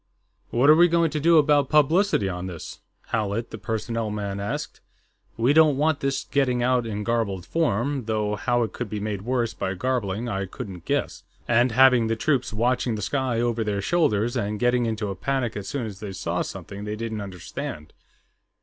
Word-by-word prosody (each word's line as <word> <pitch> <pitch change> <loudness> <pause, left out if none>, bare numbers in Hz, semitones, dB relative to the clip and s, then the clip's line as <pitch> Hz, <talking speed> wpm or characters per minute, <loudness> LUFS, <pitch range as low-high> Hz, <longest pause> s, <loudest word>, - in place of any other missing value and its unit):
"What 125 +4 +2
are 155 - +9
we 175 +2 +6
going 170 -2 +2
to 155 - -1
do 165 +2 +5
about 145 -2 +4
publicity 155 - +3
on 90 0 -4
this?" 85 -3 -8 0.3
Howlett, 110 +1 -2
the 110 - -7
personnel 115 0 -2
man, 100 -1 -4
asked. 100 +1 -4 0.6
"We 120 +5 +3
don't 155 -3 +5
want 155 +1 +2
this 135 -2 -1
getting 125 -3 +1
out 125 -1 +2
in 105 -1 -3
garbled 105 -6 -1
form 140 -4 0
though 105 -1 -1
how 120 +3 +1
it 110 - -4
could 125 -4 -5
be 105 - -3
made 105 -1 -3
worse 120 0 -1
by 95 0 -3
garbling 115 0 -1
I 100 -4 -2
couldn't 90 -1 -8
guess - - -1 0.3
and 120 +1 +3
having 125 -1 +5
the 115 - 0
troops 135 +3 0
watching 120 +1 0
the 105 - -4
sky 120 +2 0
over 120 -1 0
their 105 -2 -1
shoulders 120 - +1
and 105 -3 -2
going 120 -1 +2
into 110 -2 -2
a 95 - -4
panic 130 +3 -1
as 100 -1 -5
soon 135 -5 -3
as 100 -3 -8
they 100 -2 -6
saw 95 - -2
something 100 +1 -7
they 105 0 -3
didn't 110 -1 -4
understand." 90 -5 -7
115 Hz, 195 wpm, -24 LUFS, 105-130 Hz, 0.6 s, are